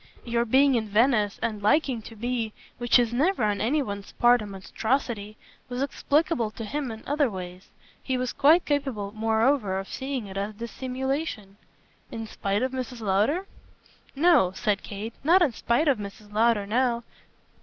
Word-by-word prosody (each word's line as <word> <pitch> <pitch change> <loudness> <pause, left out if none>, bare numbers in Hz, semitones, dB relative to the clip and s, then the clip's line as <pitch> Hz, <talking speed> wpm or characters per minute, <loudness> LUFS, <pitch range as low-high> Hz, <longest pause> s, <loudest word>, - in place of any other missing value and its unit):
"Your 235 0 0
being 270 +4 +4
in 225 -3 0
Venice 215 -1 +2
and 215 -3 -2
liking 250 +2 +2
to 225 - -11
be 230 -1 -2 0.3
which 240 +1 +4
is 240 -1 +1
never 305 - +1
on 205 -1 +1
any 285 +6 +1
one's 200 -3 -7
part 240 0 +4
a 210 - -6
monstrosity 215 +2 -2 0.3
was 250 +2 -2
explicable 290 -3 +1
for 225 - -8
him 275 +4 -3
in 220 -1 -8
other 290 -2 +1
ways. 180 -2 -8 0.3
He 260 -1 -1
was 250 -1 -2
quite 315 +5 +5
capable 270 -9 -1
moreover 220 -1 +1
of 195 0 -4
seeing 265 -3 -4
it 195 -1 -8
as 205 +2 -3
dissimulation." 255 -2 -4 0.5
"In 225 -1 -5
spite 205 0 -2
of 260 - 0
Mrs. 255 -2 -5
Lowder?" 215 - +1 0.7
"No," 295 - +4
said 210 -1 0
Kate, 215 +3 -6
"not 350 +5 +5
in 295 - +2
spite 240 +8 +1
of 270 -6 +3
Mrs. 205 +1 -9
Lowder 220 -1 +3
now. 235 +2 +1
235 Hz, 165 wpm, -26 LUFS, 210-270 Hz, 0.7 s, quite